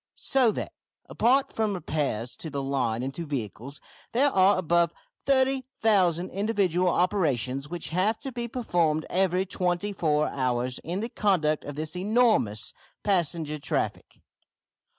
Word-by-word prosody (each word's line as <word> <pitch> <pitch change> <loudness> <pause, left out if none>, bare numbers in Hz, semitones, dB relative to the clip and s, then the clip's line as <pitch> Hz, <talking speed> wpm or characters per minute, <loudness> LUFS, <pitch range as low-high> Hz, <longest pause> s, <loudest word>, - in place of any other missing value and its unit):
So 255 -4 +3
that - - -5 0.3
apart 265 +4 +2
from 215 -2 0
repairs 130 -9 -2
to 160 - -6
the 140 -1 -3
line 125 -4 -1
and 135 +1 -3
to 170 - -5
vehicles 135 -1 -5 0.3
there 275 +4 +3
are 190 +1 +4
above 170 -1 +2 0.4
30,000 235 - +2
individual 195 -4 +1
operations 145 - 0
which 175 -1 -4
have 190 +6 +1
to 270 - -5
be 240 -1 -4
performed 170 -10 0
every 185 0 +2
twenty 185 +2 -1
four 150 -4 +1
hours 125 -1 -1
in 175 +5 -4
the 230 - -3
conduct 165 -9 +1
of 145 - -6
this 155 +3 -4
enormous 205 - +1 0.3
passenger 165 -5 0
traffic. - - -3
175 Hz, 135 wpm, -27 LUFS, 145-205 Hz, 0.4 s, are